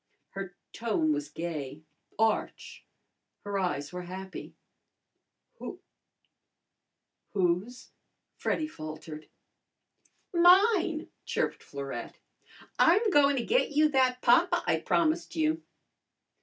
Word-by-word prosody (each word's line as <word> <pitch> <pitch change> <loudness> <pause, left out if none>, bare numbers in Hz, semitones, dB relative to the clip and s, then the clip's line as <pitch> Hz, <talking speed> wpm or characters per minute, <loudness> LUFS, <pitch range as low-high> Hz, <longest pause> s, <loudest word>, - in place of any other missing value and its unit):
Her 195 -2 -7 0.2
tone 205 -10 +1
was 145 0 -3
gay, 155 -3 -5 0.3
arch, 220 0 -1 0.6
her 200 -1 -2
eyes 145 -6 -2
were 180 - -4
happy. 190 +2 -8 1.0
"Who - - -7 1.5
whose?" 195 +7 -1 0.4
Freddy 310 - -1
faltered. 155 - -9 1.0
"Mine!" 355 -1 +4
chirped - - -2
Florette. 135 -4 -7 0.6
"I'm 410 +6 +5
goin' 285 -3 +5
to 245 - -2
get 485 -10 +1
you 305 +1 +4
that 255 -2 +2
papa 335 +9 +4
I - - +2
promised 335 0 0
you." 320 0 +1
225 Hz, 95 wpm, -29 LUFS, -, 1.5 s, I'm